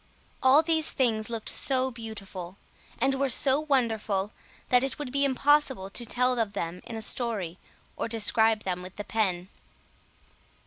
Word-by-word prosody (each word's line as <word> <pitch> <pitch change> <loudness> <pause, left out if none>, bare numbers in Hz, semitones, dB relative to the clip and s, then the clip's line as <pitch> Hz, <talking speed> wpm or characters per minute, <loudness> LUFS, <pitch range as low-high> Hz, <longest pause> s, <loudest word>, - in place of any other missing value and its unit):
All 270 +4 +6
these 320 -1 +2
things 225 -5 0
looked 230 -2 -4
so 260 -1 +3
beautiful, 200 -6 -8 0.4
and 270 - +1
were 270 0 0
so 270 +2 +4
wonderful, 225 -9 0 0.4
that 250 0 +4
it 270 - -2
would 290 -4 -6
be 280 +1 +1
impossible 270 -6 +2
to 240 - -3
tell 250 +1 +1
of 215 -3 -1
them 175 -2 -4
in 230 - -6
a 220 - -3
story, 210 -8 -2 0.4
or - - -3
describe 220 -1 +2
them 180 -1 -3
with 185 0 -10
the 205 - -5
pen. 190 -5 -1
230 Hz, 155 wpm, -27 LUFS, 200-265 Hz, 0.4 s, All